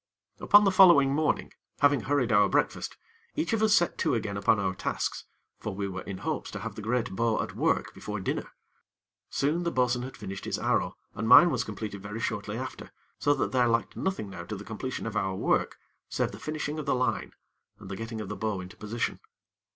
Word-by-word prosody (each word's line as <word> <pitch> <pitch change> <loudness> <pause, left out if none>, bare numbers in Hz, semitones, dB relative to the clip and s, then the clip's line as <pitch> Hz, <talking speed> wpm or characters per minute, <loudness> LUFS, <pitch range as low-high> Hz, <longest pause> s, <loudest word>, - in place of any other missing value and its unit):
Upon 205 0 +6
the 195 - +4
following 170 -8 +7
morning, 155 +1 0 0.2
having 145 -3 +4
hurried 130 0 +1
our 105 -2 +5
breakfast, - - 0 0.4
each 310 -5 -1
of 225 - +1
us 215 -1 +5
set 175 - +1
to 155 -6 +2
again 105 -3 -2
upon 100 +2 +3
our 95 -2 0
tasks; - - -3 0.3
for 105 - -5
we 100 0 -2
were 95 -1 -5
in 95 0 -6
hopes - - -2
to - - -6
have - - -5
the - - -8
great 115 +2 -1
bow 115 +1 +1
at - - -3
work - - 0
before 105 0 -5
dinner. 95 - -3 0.8
Soon, 150 +5 0
the 170 - 0
bo'sun 125 -4 +1
had 130 +2 -7
finished 95 0 -7
his - - -1
arrow, - - 0 0.2
and 110 +2 -3
mine 165 +9 +9
was 125 -3 0
completed 105 -3 -6
very 105 +3 -6
shortly 110 -2 -3
after, 130 +1 -6 0.3
so 145 0 +3
that - - -1
there 125 -2 +3
lacked 115 -1 0
nothing 185 - -2
now 85 -3 -7
to 105 - -5
the 100 +1 -8
completion 120 +3 -5
of 115 -1 -4
our 95 -2 0
work, - - +1 0.3
save - - -1
the - - -10
finishing 155 0 -3
of 150 - -6
the - - +3
line, 125 0 -1 0.4
and - - -12
the 95 - -5
getting 115 +1 -5
of 105 - -6
the 105 - -4
bow 105 0 -2
into 90 0 -9
position. 110 +2 -3
115 Hz, 215 wpm, -28 LUFS, 105-145 Hz, 0.8 s, mine